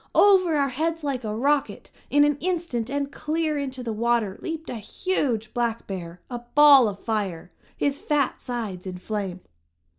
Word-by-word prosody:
Over 370 -5 +5
our 280 -2 +2
heads 320 +5 -2
like 270 -4 -2
a 215 -1 -3
rocket, 280 +4 0 0.2
in 290 0 +5
an 295 -1 +2
instant 335 -10 -2
and 280 0 -2
clear 310 0 -1
into 265 -2 -4
the 230 -2 -3
water, 225 -3 0
leaped 325 -1 -5
a 240 - -4
huge 225 - -2
black 235 -2 -1
bear, 180 -3 -6
a 245 -1 -5 0.2
ball 285 -4 +8
of 200 -2 -4
fire! 200 -6 -3 0.3
his 285 0 -1
fat 290 -3 0
sides 215 -7 -5
in 180 -1 -5
flame. 190 -2 -4
255 Hz, 170 wpm, -25 LUFS, 215-295 Hz, 0.3 s, ball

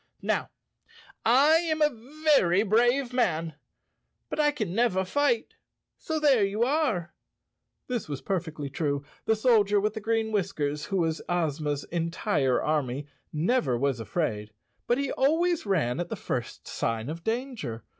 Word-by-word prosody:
"Now, - - 0 0.7
I 280 +7 +6
am 315 -1 0
a 295 +2 -3
very 200 - +4
brave 240 +4 +2
man, 165 -10 0 0.8
but - - -3
I 300 -1 +5
can 215 -12 -3
never 195 -4 +2
fight, 290 - +1 0.5
so 315 -1 -2
there 275 -8 +4
you 200 +3 +1
are." 250 - 0 0.7
This 245 -9 -3
was 145 -2 -3
perfectly 160 -6 -3
true. 140 0 -2 0.2
The 220 - +3
Soldier 215 -3 +3
with 210 +1 0
the 220 - -5
Green 225 0 0
Whiskers, 150 -8 -1
who 195 - -2
was 165 -2 0
Ozma's 150 -4 -1
en¬ 165 -1 -1
tire 145 - +1
army, 145 -3 -1 0.3
never 155 - +1
was 135 -1 0
afraid, 110 -5 -2 0.4
but 240 - +2
he 280 -1 -1
always 325 +1 +1
ran 155 -9 +1
at 175 0 -3
the - - -3
first 120 -2 -5
sign 115 0 -2
of 165 +3 -6
danger. 225 - -3
195 Hz, 150 wpm, -27 LUFS, 150-250 Hz, 0.8 s, I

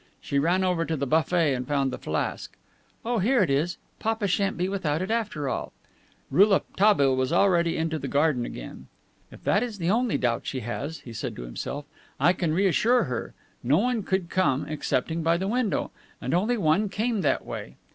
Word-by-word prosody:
She 140 - -1
ran 175 +6 +2
over 180 -3 +1
to 160 0 -2
the 140 - -1
buffet 160 +1 +2
and 125 -1 -3
found 140 -2 +1
the - - -5
flask. 80 - -3 0.5
"Oh, 240 0 0
here 235 +3 +3
it 160 - 0
is. 155 +6 0 0.2
Papa 225 -1 -1
shan't 195 +1 0
be 180 +1 0
without 170 -6 -1
it, 185 +4 -3
after 210 -11 -1
all." - - -3 0.6
Rouletabille 190 -4 +4
was 130 +2 0
already 170 -2 +3
into 160 -1 -1
the - - -4
garden 145 -4 +2
again. 65 - -8 0.4
"If - - -14
that 200 - +2
is 235 -4 -3
the 175 0 0
only 240 +1 +1
doubt 120 -2 -1
she 130 - -3
has," 140 +7 -5
he 120 - -10
said - - -4
to - - -7
himself, 135 - -5 0.3
"I 175 - +5
can 170 -3 -1
reassure 200 +8 +3
her. 125 -2 -4 0.3
No 135 +5 +3
one 240 +2 +1
could 190 -3 -2
come, 155 -7 +1
excepting 155 +1 -1
by 165 +1 +2
the 190 +2 -2
window. 230 -1 0 0.3
And - - -3
only 215 +8 +2
one 195 +3 +2
came 220 +1 -1
that 140 -5 +1
way." - - -7
170 Hz, 195 wpm, -26 LUFS, 140-200 Hz, 0.6 s, I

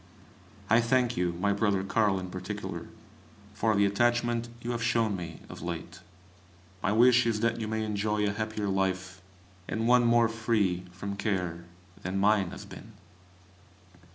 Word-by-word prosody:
I 115 +2 +5
thank 120 +1 +2
you, 90 -1 0
my 100 +4 0
brother 100 -2 +1
Carl 100 -1 +2
in 90 -1 -7
particular, 90 0 -5 0.7
for 110 +1 +1
the 100 0 +4
attachment 120 +3 +1
you 120 - -2
have 120 -1 -3
shown 115 -3 +1
me 85 -3 -7
of - - -10
late. 85 0 -6 0.8
My 100 - +1
wish 120 +2 +5
is 110 -2 0
that 115 0 +1
you 110 - -3
may 110 0 -1
enjoy 105 0 0
a 100 - +1
happier 110 -1 -3
life, 95 -1 -1 0.5
and 110 +1 -1
one 125 0 +5
more 115 0 +5
free 110 -6 0
from 100 +2 -6
care, 90 -5 -2 0.4
than 95 0 -3
mine 100 -2 +3
has - - -9
been. - - -12
105 Hz, 155 wpm, -29 LUFS, 95-115 Hz, 0.8 s, I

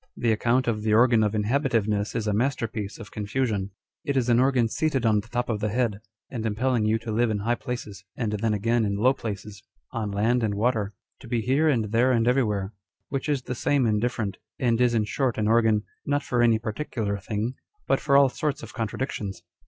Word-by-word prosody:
The 115 - +1
account 120 +4 +1
of 110 -2 0
the 110 0 +2
organ 120 -1 +5
of 105 0 0
inhabitiveness 110 -3 0
is 110 - -1
a 105 - 0
master 120 +2 0
piece 105 -1 -5
of 115 -4 -10
confusion. 105 -2 -1 0.3
It 140 -1 -1
is 125 -2 +1
an 120 0 +5
organ 130 -3 +3
seated 135 0 0
on 110 -2 +4
the 105 - -8
top 120 +1 -2
of 110 -3 -1
the 105 +1 -1
head, 110 -2 0 0.3
and 115 -4 -4
impelling 115 +1 +1
you 110 +1 +2
to 115 0 -6
live 115 +2 +2
in 110 - 0
high 110 +4 0
places, 120 -7 -6
and 115 -4 -1
then 105 +1 0
again 115 +3 +1
in 100 -1 0
low 125 +6 +4
places; 105 -4 -6 0.3
on 115 -5 -3
land 110 +5 +1
and 105 -3 0
water; 105 -2 0 0.2
to 130 - -12
be 120 -1 0
here 140 +7 +2
and 110 -7 0
there 120 +3 +3
and 115 -2 +2
everywhere; 105 -6 +1 0.4
which 135 +2 -3
is 140 -4 0
the 125 - -4
same 135 +2 +1
and 105 -2 +1
different, 110 -5 -2 0.2
and 120 -2 +1
is 120 -1 +3
in 110 - +3
short 125 +4 -1
an 105 -1 +1
organ, 110 -2 +3 0.2
not 145 0 0
for 125 -3 0
any 115 -2 +5
particular 110 -2 -3
thing, 105 +4 -3 0.3
but - - +2
for 140 -2 +3
all 140 -1 +7
sorts 150 +2 -3
of - - -9
contradictions. 110 -4 -4
115 Hz, 220 wpm, -26 LUFS, 105-125 Hz, 0.4 s, all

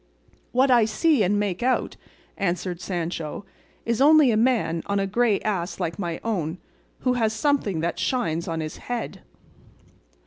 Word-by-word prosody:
"What 260 +2 +3
I 240 -3 +6
see 285 +6 +2
and 205 +1 +2
make 200 -2 -2
out," 255 +1 0 0.4
answered 180 -2 -2
Sancho, 170 -1 -4 0.4
"is 230 +1 0
only 300 -2 +6
a - - +2
man 220 -8 +1
on 200 0 0
a 195 - +1
grey 215 +1 +2
ass 190 -4 -2
like 165 +2 -3
my 170 -3 -3
own, 180 -7 -2 0.4
who 255 - +2
has 225 -3 +1
something 220 - 0
that 170 0 -2
shines 170 -11 -1
on 165 -1 -2
his 155 0 -5
head." 235 -6 -5
205 Hz, 160 wpm, -24 LUFS, 175-245 Hz, 0.4 s, I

